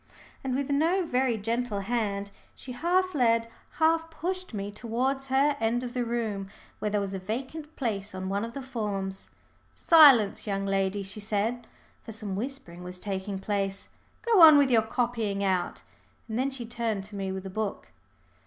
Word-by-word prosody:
And 260 Hz, -1 st, -1 dB
with 280 Hz, +1 st, -1 dB
no 335 Hz, +6 st, +2 dB
very 255 Hz, -5 st, +1 dB
gentle 225 Hz, 0 st, -2 dB
hand, 200 Hz, -2 st, -2 dB, 0.2 s
she 260 Hz, -, -9 dB
half 360 Hz, +8 st, +1 dB
led, 230 Hz, -4 st, +3 dB, 0.3 s
half 325 Hz, +1 st, +2 dB
pushed 365 Hz, +4 st, -4 dB
me 205 Hz, -2 st, -4 dB
towards 255 Hz, +5 st, -2 dB
her 275 Hz, +2 st, +3 dB
end 230 Hz, +2 st, 0 dB
of 245 Hz, -1 st, -5 dB
the 250 Hz, -, 0 dB
room, 220 Hz, -5 st, -2 dB, 0.3 s
where 210 Hz, -, -1 dB
there 210 Hz, 0 st, +1 dB
was 200 Hz, -1 st, -3 dB
a 190 Hz, -, -3 dB
vacant 265 Hz, +10 st, -5 dB
place 205 Hz, -6 st, -3 dB
on 185 Hz, 0 st, -4 dB
one 200 Hz, +2 st, -1 dB
of 230 Hz, 0 st, -5 dB
the 275 Hz, -, -6 dB
forms. 200 Hz, -6 st, -4 dB, 0.5 s
"Silence, 270 Hz, -12 st, +6 dB
young 195 Hz, -1 st, -1 dB
ladies," 195 Hz, 0 st, 0 dB
she 195 Hz, +3 st, -5 dB
said, 215 Hz, +3 st, -2 dB, 0.4 s
for 225 Hz, -, -8 dB
some 210 Hz, -3 st, -5 dB
whispering 210 Hz, -7 st, -5 dB
was 180 Hz, 0 st, -7 dB
taking 195 Hz, +1 st, -4 dB
place. 195 Hz, 0 st, -2 dB, 0.3 s
"Go 450 Hz, -6 st, +4 dB
on 310 Hz, -2 st, +10 dB
with 280 Hz, -2 st, +4 dB
your 230 Hz, -2 st, +5 dB
copying 220 Hz, -3 st, -1 dB
out." 185 Hz, -2 st, -1 dB, 0.4 s
And 220 Hz, +1 st, -3 dB
then 265 Hz, +2 st, +1 dB
she 260 Hz, -3 st, -5 dB
turned 225 Hz, -4 st, -2 dB
to 205 Hz, +1 st, -10 dB
me 195 Hz, -1 st, -3 dB
with 190 Hz, 0 st, -5 dB
a 190 Hz, -, -6 dB
book. 215 Hz, 0 st, -4 dB
225 Hz, 180 wpm, -28 LUFS, 200-265 Hz, 0.5 s, on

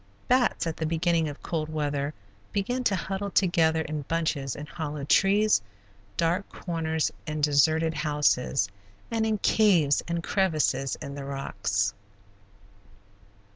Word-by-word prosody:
Bats, 250 Hz, -6 st, +2 dB
at 165 Hz, -1 st, -3 dB
the 160 Hz, -, -1 dB
beginning 165 Hz, -1 st, +1 dB
of 145 Hz, -, -10 dB
cold 155 Hz, -2 st, -2 dB
weather, 145 Hz, -2 st, -1 dB, 0.4 s
begin 245 Hz, +6 st, -1 dB
to 205 Hz, -, +3 dB
huddle 195 Hz, +2 st, -3 dB
together 165 Hz, -5 st, +3 dB
in 155 Hz, -1 st, -4 dB
bunches 145 Hz, -3 st, -1 dB
in 145 Hz, -, -6 dB
hollow 150 Hz, -2 st, -5 dB
trees, 200 Hz, -, +4 dB, 0.6 s
dark 175 Hz, +4 st, 0 dB
corners 160 Hz, -3 st, -2 dB, 0.2 s
in 155 Hz, 0 st, -3 dB
deserted 155 Hz, +2 st, +3 dB
houses, 145 Hz, -6 st, +1 dB, 0.4 s
and 225 Hz, -1 st, +1 dB
in 215 Hz, -1 st, +1 dB
caves 185 Hz, -9 st, +3 dB
and 170 Hz, 0 st, -2 dB
crevices 155 Hz, -9 st, +1 dB
in 140 Hz, -, -6 dB
the 140 Hz, 0 st, -6 dB
rocks. 105 Hz, -7 st, -1 dB
160 Hz, 130 wpm, -27 LUFS, 145-185 Hz, 0.6 s, trees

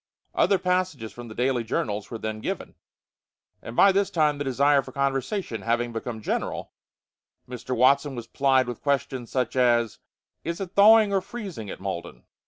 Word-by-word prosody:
Other 195 Hz, -, +3 dB
passages 180 Hz, -, -1 dB
from 120 Hz, 0 st, -9 dB
the 110 Hz, -, -10 dB
daily 125 Hz, -1 st, +1 dB
journals 105 Hz, -2 st, -2 dB
were 115 Hz, -, -5 dB
then 110 Hz, -1 st, -4 dB
given, -, -, -4 dB, 0.9 s
and 115 Hz, -, -8 dB
by 200 Hz, -, +7 dB
this 195 Hz, +1 st, +1 dB
time 150 Hz, -3 st, +1 dB
the -, -, -1 dB
desire 140 Hz, +1 st, +3 dB
for -, -, -11 dB
conversation 135 Hz, -, -2 dB
having 120 Hz, +2 st, -1 dB
become 115 Hz, -1 st, -5 dB
general, -, -, -3 dB, 0.8 s
Mr. 125 Hz, +1 st, -5 dB
Watson 140 Hz, +3 st, +3 dB
was 120 Hz, -2 st, -6 dB
plied 130 Hz, +1 st, +2 dB
with 120 Hz, -2 st, -6 dB
questions 140 Hz, -4 st, -1 dB
such 125 Hz, -2 st, -1 dB
as: 120 Hz, -3 st, +2 dB, 0.4 s
"Is 170 Hz, +1 st, -3 dB
it 190 Hz, -3 st, -5 dB
thawing 215 Hz, 0 st, +6 dB
or 195 Hz, -, +2 dB
freezing 185 Hz, -, -7 dB
at -, -, -7 dB
Malden? 95 Hz, -3 st, -6 dB
130 Hz, 170 wpm, -25 LUFS, 115-155 Hz, 0.9 s, by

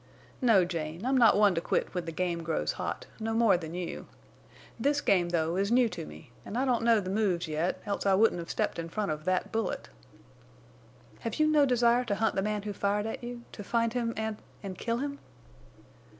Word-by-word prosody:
"No, 220 Hz, -8 st, +5 dB
Jane, 165 Hz, +2 st, -4 dB
I'm 265 Hz, +1 st, +2 dB
not 230 Hz, -6 st, +6 dB
one 205 Hz, -2 st, +5 dB
to 165 Hz, -, -1 dB
quit -, -, -1 dB
when 180 Hz, -2 st, -3 dB
the 165 Hz, -, -4 dB
game 170 Hz, 0 st, -1 dB
grows 165 Hz, -1 st, -1 dB
hot, -, -, -4 dB
no 225 Hz, 0 st, -2 dB
more 230 Hz, -4 st, +5 dB
than 165 Hz, -1 st, -5 dB
you. 180 Hz, -1 st, -5 dB, 0.7 s
This 285 Hz, +5 st, +2 dB
game, 180 Hz, -9 st, +2 dB
though, 165 Hz, 0 st, 0 dB
is 200 Hz, +2 st, 0 dB
new 245 Hz, 0 st, +5 dB
to 75 Hz, -, -6 dB
me, 75 Hz, +9 st, -12 dB
an' 225 Hz, -, -5 dB
I 260 Hz, -, +1 dB
don't 250 Hz, -3 st, +2 dB
know 230 Hz, -1 st, +4 dB
the 185 Hz, -2 st, -4 dB
moves 195 Hz, -5 st, +1 dB
yet, 155 Hz, +3 st, -1 dB
else 200 Hz, -1 st, -2 dB
I 195 Hz, -, +5 dB
wouldn't 210 Hz, -3 st, +3 dB
have 170 Hz, -, -7 dB
stepped -, -, -1 dB
in 165 Hz, 0 st, -4 dB
front 205 Hz, 0 st, -2 dB
of 155 Hz, 0 st, -5 dB
that 185 Hz, 0 st, 0 dB
bullet." 220 Hz, -, -2 dB, 1.3 s
"Have 230 Hz, -1 st, -4 dB
you 310 Hz, -, +3 dB
no 300 Hz, -2 st, +4 dB
desire 240 Hz, -1 st, +3 dB
to 205 Hz, -, 0 dB
hunt 220 Hz, +2 st, +1 dB
the 195 Hz, -, 0 dB
man 210 Hz, 0 st, -2 dB
who 205 Hz, -1 st, -4 dB
fired 205 Hz, +1 st, 0 dB
at 225 Hz, -, -5 dB
you—to 240 Hz, -3 st, -8 dB
find 230 Hz, +2 st, 0 dB
him—and—and 220 Hz, -5 st, -4 dB
kill 230 Hz, 0 st, -1 dB
him?" 280 Hz, +2 st, -4 dB
205 Hz, 205 wpm, -29 LUFS, 175-230 Hz, 1.3 s, not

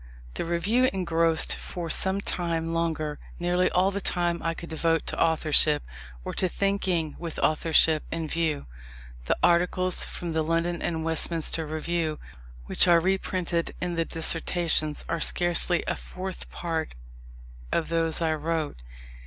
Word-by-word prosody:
The -, -, -3 dB
Review 205 Hz, +10 st, +2 dB
engrossed, 165 Hz, -3 st, +1 dB
for 175 Hz, -2 st, -6 dB
some 190 Hz, +1 st, +1 dB
time 165 Hz, -3 st, -2 dB
longer, 160 Hz, -3 st, -2 dB, 0.2 s
nearly 175 Hz, +1 st, +1 dB
all 185 Hz, +2 st, +2 dB
the 200 Hz, 0 st, -4 dB
time 175 Hz, -2 st, 0 dB
I 165 Hz, +1 st, -2 dB
could 170 Hz, -, -9 dB
devote 165 Hz, 0 st, 0 dB
to -, -, -3 dB
authorship, 155 Hz, -2 st, +5 dB, 0.4 s
or -, -, -4 dB
to 185 Hz, -, +1 dB
thinking 185 Hz, -5 st, -1 dB
with 170 Hz, -2 st, -6 dB
authorship 155 Hz, 0 st, +3 dB
in 165 Hz, -1 st, -3 dB
view. 160 Hz, -2 st, -1 dB, 0.6 s
The -, -, 0 dB
articles 180 Hz, +1 st, +3 dB
from 170 Hz, -2 st, -5 dB
the 160 Hz, -, +1 dB
London 165 Hz, +2 st, -1 dB
and 160 Hz, -2 st, -2 dB
Westminster 165 Hz, 0 st, +1 dB
Review 155 Hz, 0 st, -2 dB, 0.5 s
which 65 Hz, -, +3 dB
are 170 Hz, -1 st, +6 dB
reprinted 180 Hz, -2 st, -1 dB
in 175 Hz, 0 st, -2 dB
the 165 Hz, -1 st, 0 dB
Dissertations, 165 Hz, -1 st, +1 dB
are 170 Hz, -, -2 dB
scarcely 175 Hz, +2 st, +3 dB
a -, -, -1 dB
fourth 185 Hz, 0 st, -8 dB
part 165 Hz, -, -4 dB, 0.8 s
of 160 Hz, -, -1 dB
those 165 Hz, 0 st, +1 dB
I 160 Hz, -1 st, +1 dB
wrote. 155 Hz, -, -2 dB
165 Hz, 145 wpm, -26 LUFS, 160-175 Hz, 0.8 s, are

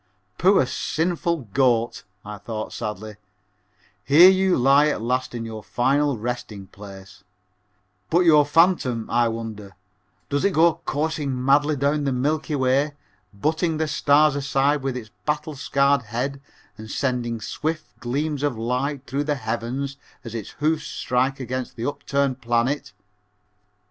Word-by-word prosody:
"Poor 190 Hz, -5 st, +5 dB
sinful 170 Hz, +3 st, -1 dB
goat," 120 Hz, -3 st, +1 dB, 0.2 s
I 105 Hz, -1 st, -7 dB
thought 110 Hz, +1 st, -6 dB
sadly, 105 Hz, 0 st, -6 dB, 0.9 s
"here 170 Hz, +7 st, +8 dB
you 190 Hz, -1 st, +2 dB
lie 140 Hz, +4 st, +5 dB
at 150 Hz, -, -1 dB
last 125 Hz, +2 st, -2 dB
in 115 Hz, -1 st, -4 dB
your 110 Hz, -1 st, -7 dB
final 135 Hz, +4 st, +1 dB
resting 110 Hz, -3 st, -5 dB
place, 95 Hz, -1 st, -13 dB, 0.9 s
but 175 Hz, -, +3 dB
your 155 Hz, -4 st, +6 dB
phantom, 145 Hz, -7 st, +2 dB
I 120 Hz, 0 st, +3 dB
wonder, 110 Hz, -4 st, -6 dB, 0.5 s
does 145 Hz, 0 st, -1 dB
it 200 Hz, -, +2 dB
go 165 Hz, 0 st, +3 dB
coursing 145 Hz, -4 st, -2 dB
madly 145 Hz, +2 st, +3 dB
down 145 Hz, +2 st, 0 dB
the 135 Hz, -, +1 dB
Milky 150 Hz, +4 st, -1 dB
Way, 135 Hz, +2 st, +1 dB, 0.4 s
butting 155 Hz, -, -1 dB
the 160 Hz, 0 st, 0 dB
stars 150 Hz, 0 st, +3 dB
aside 140 Hz, +1 st, +1 dB
with 130 Hz, -1 st, -2 dB
its 110 Hz, -4 st, -9 dB, 0.2 s
battle 150 Hz, +1 st, -1 dB
scarred 140 Hz, 0 st, +2 dB
head 125 Hz, +5 st, -4 dB, 0.4 s
and 110 Hz, 0 st, -9 dB
sending 120 Hz, -3 st, -2 dB
swift 155 Hz, +8 st, -3 dB
gleams 140 Hz, +4 st, -2 dB
of 145 Hz, -5 st, -1 dB
light 130 Hz, +4 st, -2 dB
through 140 Hz, +3 st, -2 dB
the 150 Hz, -1 st, 0 dB
heavens 125 Hz, +3 st, -4 dB, 0.3 s
as 115 Hz, -2 st, -8 dB
its 110 Hz, -4 st, -5 dB
hoofs 155 Hz, +1 st, 0 dB
strike 130 Hz, +2 st, -1 dB
against 130 Hz, 0 st, -5 dB
an 115 Hz, -, -3 dB
upturned 140 Hz, -2 st, -1 dB
planet? 120 Hz, +4 st, 0 dB
135 Hz, 140 wpm, -23 LUFS, 120-150 Hz, 0.9 s, here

